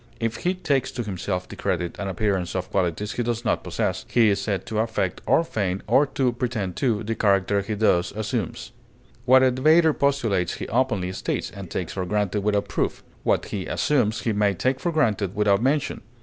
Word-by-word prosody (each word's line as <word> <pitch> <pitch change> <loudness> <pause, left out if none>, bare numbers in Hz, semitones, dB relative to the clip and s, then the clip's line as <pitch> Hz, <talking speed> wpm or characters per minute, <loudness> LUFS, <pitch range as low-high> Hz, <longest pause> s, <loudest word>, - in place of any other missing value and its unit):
If 115 -1 -1
he 180 +2 0
takes 140 -7 0
to 120 - -3
himself 95 -2 -3
the - - -9
credit 85 -1 -2
and 100 -1 -3
appearance 95 -2 -1
of 90 -1 -3
qualities 95 +2 -1
he - - -2
does 120 0 -2
not - - +1
possess, - - -2
he 115 -3 +4
is 100 -1 +1
said 100 -3 -2
to 110 - -2
affect 110 -5 -1
or 165 - +4
feign, 100 - -2
or 135 +7 +4
to 130 -2 0
pretend 115 -7 -3
to, 115 -5 +1
the 110 +1 -2
character 100 -2 +2
he 105 +2 -3
thus 100 -5 +2
assumes. 110 -1 -3 0.5
What 130 +1 +6
a 130 - +5
debater 155 +5 +4
postulates 115 -12 +1
he - - -6
openly 110 -7 0
states 95 - -3
and 100 -3 -9
takes 85 -1 -4
for 95 -2 -3
granted 105 0 0
without 105 0 0
proof; - - -2 0.2
what - - +1
he 95 -3 -4
assumes 115 -8 +1
he 110 +1 0
may 100 -1 +2
take 130 +8 0
for 175 - -1
granted 110 - +1
without 105 -1 +3
mention. 140 +3 0
105 Hz, 200 wpm, -24 LUFS, 95-125 Hz, 0.5 s, What